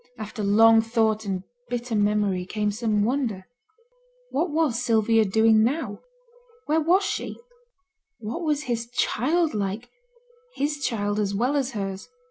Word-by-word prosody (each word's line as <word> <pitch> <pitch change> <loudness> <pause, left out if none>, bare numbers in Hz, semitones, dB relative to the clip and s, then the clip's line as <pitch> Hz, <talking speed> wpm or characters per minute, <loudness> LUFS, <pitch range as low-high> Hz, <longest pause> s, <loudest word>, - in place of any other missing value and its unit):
After 215 -1 -6
long 225 +3 +6
thought 220 -1 0
and 190 -2 -3 0.3
bitter 245 0 -3
memory 205 -3 +1
came 210 +3 -2
some 210 -1 0
wonder. 230 -6 -1 0.9
What 325 +6 0
was 295 -6 0
Sylvia 225 -2 +3
doing 220 +2 +4
now? 240 -4 -1 0.7
Where 315 +2 +2
was 360 +6 +3
she? - - -3 0.8
What 235 +8 -5
was 300 -3 0
his 235 -2 -3
child 300 +7 0
like 205 +3 -3 0.6
his 295 +1 -1
child 205 -3 -1
as 200 -1 -1
well 250 +7 +1
as 270 -2 -1
hers? 195 -4 -5
225 Hz, 135 wpm, -25 LUFS, 210-260 Hz, 0.9 s, long